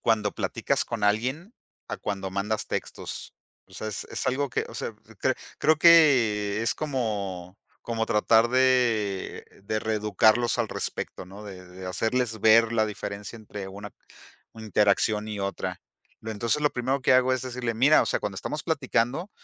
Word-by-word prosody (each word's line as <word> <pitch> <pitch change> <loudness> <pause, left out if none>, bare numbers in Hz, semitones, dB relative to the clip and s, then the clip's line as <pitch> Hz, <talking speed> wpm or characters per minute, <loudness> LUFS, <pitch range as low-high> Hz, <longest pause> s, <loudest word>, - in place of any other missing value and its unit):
cuando 105 -2 +1
platicas - - -1
con 115 -3 -5
alguien, 130 - 0 0.4
a - - -3
cuando 95 -2 -4
mandas 105 +3 -2
textos. - - -5 0.3
O 95 - -23
sea, 110 - -5
es 105 - -4
es - - -3
algo 140 +2 0
que, - - -1
o - - -11
sea, - - -4 0.3
cre - - +2 0.2
creo 155 0 +4
que 120 -11 +5
es 115 - +1
como 100 -10 -3 0.3
como 115 -1 -2
tratar 110 +2 +4
de 120 -6 +1 0.2
de 110 +1 -1
reeducarlos 110 +2 +2
al 115 -3 0
respecto, - - -5
¿no? 100 +3 -11
De 90 -2 -10
de 90 +1 -10
hacerles 110 +3 -1
ver 115 +1 +5
la 110 -1 +2
diferencia 105 +1 -6
entre 105 -3 -8
una 100 +2 -9 0.6
una 110 -1 -10
interacción 105 +2 +2
y 105 -2 -4
otra. 100 0 -4 0.4
Lo 110 - -6
entonces 115 +7 -1
lo 150 - +3
primero 130 +3 -1
que 130 - +4
hago 130 0 +4
es 130 0 -1
decirle: 125 -2 -3
"Mira, 135 +7 +5
o - - -3
sea, - - +1
cuando - - -4
estamos - - -4
platicando, 140 - 0
110 Hz, 170 wpm, -26 LUFS, 105-125 Hz, 0.6 s, que